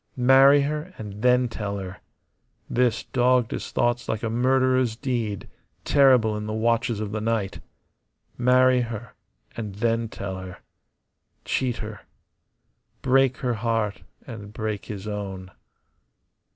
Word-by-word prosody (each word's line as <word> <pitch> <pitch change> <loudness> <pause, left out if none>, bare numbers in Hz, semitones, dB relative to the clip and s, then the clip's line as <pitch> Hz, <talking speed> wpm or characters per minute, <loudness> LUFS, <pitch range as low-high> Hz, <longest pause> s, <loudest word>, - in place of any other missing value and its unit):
Marry 135 +3 +6
her, 150 +5 -4
and 105 -1 -8
then 125 0 +4
tell 105 -3 -4
her. 95 -1 -7 0.7
This 120 -2 +1
dogged 125 -1 +2
his - - -4
thoughts 120 0 0
like 110 - -2
a 115 - -1
murderer's 130 0 +2
deed, 115 -5 -3 0.4
terrible 130 -6 +4
in 105 0 -4
the 105 - -3
watches 115 0 +1
of 105 -1 -4
the 110 0 -3
night. 110 -3 -1 0.8
Marry 125 +1 +4
her, 115 -1 -6 0.4
and 105 -4 -5
then 115 +1 0
tell 95 -3 -5
her. 95 -1 -9 0.9
Cheat 125 -3 0
her. 105 -2 -8 1.0
Break 130 -1 +3
her 125 - +1
heart 115 -2 -1 0.2
and 105 -4 -9
break 110 -1 -4
his 105 -2 -7
own. 95 -3 -5
115 Hz, 130 wpm, -24 LUFS, 105-125 Hz, 1.0 s, Marry